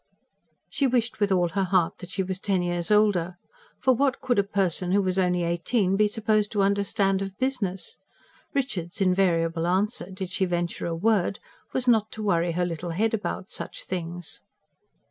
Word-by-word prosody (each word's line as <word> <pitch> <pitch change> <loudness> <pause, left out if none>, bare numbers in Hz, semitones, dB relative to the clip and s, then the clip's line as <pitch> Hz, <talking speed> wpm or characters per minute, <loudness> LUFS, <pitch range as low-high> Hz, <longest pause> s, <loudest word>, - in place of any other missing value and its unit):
She 280 - 0
wished 240 -3 0
with 205 -1 +2
all 175 -2 +3
her 195 +3 0
heart 180 -2 +1
that 180 - -9
she 190 +1 -1
was 185 0 -4
ten 190 -3 0
years 175 -1 -1
older. 205 -5 +3 0.4
For 260 - +4
what 270 +2 +1
could 245 -5 +1
a - - +4
person 190 -2 0
who 200 - +4
was 185 0 0
only 180 -1 +2
eighteen 180 +4 +1
be 210 +1 +4
supposed 215 0 0
to 205 -2 +2
understand 195 -1 +1
of 195 -1 -5
business? 220 -8 -2 0.5
Richard's 200 -10 -3
invariable 170 -3 +2
answer, 190 +2 0
did 190 -1 -6
she 190 - +1
venture 175 -1 -2
a 165 - -2
word, 200 +1 +1 0.3
was 255 -1 -2
not 220 -3 +4
to 215 - -5
worry 170 -4 +1
her 180 +1 0
little 175 0 -4
head 215 +7 0
about 205 -3 -3
such - - -6
things. 175 -1 -4
190 Hz, 180 wpm, -26 LUFS, 175-210 Hz, 0.5 s, For